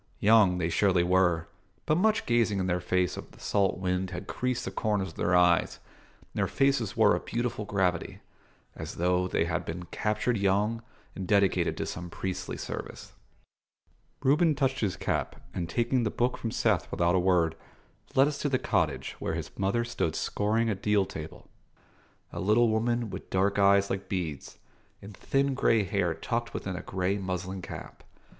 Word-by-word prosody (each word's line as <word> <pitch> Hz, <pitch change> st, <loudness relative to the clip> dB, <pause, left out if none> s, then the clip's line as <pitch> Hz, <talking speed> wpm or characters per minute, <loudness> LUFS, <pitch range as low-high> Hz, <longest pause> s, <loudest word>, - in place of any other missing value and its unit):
Young 105 Hz, -4 st, +5 dB
they 85 Hz, -2 st, 0 dB
surely 90 Hz, 0 st, +3 dB
were, 90 Hz, -2 st, +2 dB, 0.4 s
but 155 Hz, -, +2 dB
much 215 Hz, +5 st, +2 dB
gazing 115 Hz, -4 st, +2 dB
in 95 Hz, -, 0 dB
the 90 Hz, -1 st, 0 dB
face 90 Hz, 0 st, 0 dB
of -, -, -8 dB
the -, -, -17 dB
salt 100 Hz, -3 st, +1 dB
wind 90 Hz, 0 st, -1 dB
had 90 Hz, -1 st, -6 dB
creased 125 Hz, -1 st, -2 dB
the 95 Hz, -, -4 dB
corners 100 Hz, -1 st, -1 dB
of -, -, -13 dB
their 90 Hz, -, +1 dB
eyes, 90 Hz, -1 st, +3 dB, 0.4 s
and -, -, -27 dB
their -, -, +2 dB
faces 135 Hz, -7 st, +1 dB
wore 105 Hz, -3 st, +5 dB
a -, -, -1 dB
beautiful 120 Hz, 0 st, -3 dB
gravity, 95 Hz, -4 st, -1 dB, 0.6 s
as -, -, -7 dB
though 90 Hz, +1 st, +1 dB
they 80 Hz, -, +1 dB
had 85 Hz, +1 st, -2 dB
been 85 Hz, +1 st, -5 dB
captured 105 Hz, +3 st, 0 dB
young 100 Hz, +4 st, +1 dB, 0.3 s
and 95 Hz, -2 st, -6 dB
dedicated 100 Hz, -1 st, +2 dB
to -, -, -2 dB
some 90 Hz, 0 st, -6 dB
priestly 95 Hz, +1 st, -4 dB
service. -, -, -7 dB, 1.1 s
Reuben 150 Hz, +3 st, +4 dB
touched 135 Hz, -1 st, 0 dB
his 100 Hz, -5 st, 0 dB
cap, -, -, -2 dB, 0.2 s
and, 85 Hz, -2 st, -3 dB
taking 120 Hz, +2 st, +1 dB
the 110 Hz, -, 0 dB
book 120 Hz, +3 st, 0 dB
from 115 Hz, -, -4 dB
Seth -, -, +1 dB
without 85 Hz, 0 st, +1 dB
a 95 Hz, -, +3 dB
word, 90 Hz, -3 st, +2 dB, 0.6 s
led 135 Hz, +2 st, +6 dB
us 145 Hz, -1 st, -3 dB
to 145 Hz, -, 0 dB
the 130 Hz, -, +2 dB
cottage, -, -, -1 dB
where -, -, -2 dB
his -, -, -5 dB
mother 100 Hz, +5 st, 0 dB
stood 85 Hz, -9 st, -2 dB
scouring 110 Hz, +3 st, 0 dB
a 110 Hz, -, +1 dB
deal 100 Hz, 0 st, +1 dB
table: 80 Hz, -5 st, -9 dB, 0.9 s
a -, -, -5 dB
little 110 Hz, +4 st, +3 dB
woman 115 Hz, 0 st, 0 dB
with -, -, -8 dB
dark 100 Hz, +2 st, +1 dB
eyes 100 Hz, 0 st, +4 dB
like 95 Hz, 0 st, -4 dB
beads, 85 Hz, -7 st, -4 dB, 0.4 s
and 100 Hz, 0 st, -11 dB
thin 135 Hz, +5 st, 0 dB
grey 115 Hz, -4 st, +3 dB
hair 90 Hz, -3 st, 0 dB
tucked 115 Hz, +8 st, -3 dB
within 95 Hz, -1 st, -4 dB
a 90 Hz, -, -5 dB
grey 95 Hz, +2 st, -1 dB
muslin 95 Hz, 0 st, -4 dB
cap. -, -, -9 dB
100 Hz, 180 wpm, -28 LUFS, 90-115 Hz, 1.1 s, led